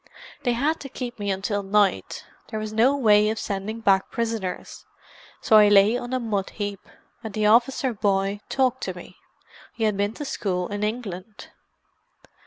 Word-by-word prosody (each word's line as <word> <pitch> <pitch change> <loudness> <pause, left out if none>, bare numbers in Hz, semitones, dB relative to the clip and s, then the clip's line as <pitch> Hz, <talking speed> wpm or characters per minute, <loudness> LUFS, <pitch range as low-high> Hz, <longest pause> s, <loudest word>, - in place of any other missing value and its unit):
"They 245 -3 +1
had 290 +7 0
to 275 - -8
keep 245 -3 -6
me 205 -1 -2
until 195 +2 -1
night—there 205 +2 -1
was 215 0 -5
no 250 +6 +3
way 210 -4 +4
of 220 - -2
sending 210 +2 -4
back 195 -3 +3
prisoners. 225 -6 -4 0.5
So 220 - +5
I 210 -1 +7
lay 205 +2 +5
on 245 0 -4
a 255 - 0
mud 210 -5 -2
heap, 205 -2 -6 0.3
and 220 -3 -7
the 215 -1 0
officer 245 +4 +3
boy 200 -1 0
talked 260 -1 +1
to - - -4
me—he 225 - -12
had 215 -2 +2
been 205 +2 -1
to 295 - -6
school 180 -8 -2
in 205 0 -4
England." 210 -2 -5
215 Hz, 165 wpm, -24 LUFS, 200-235 Hz, 0.5 s, I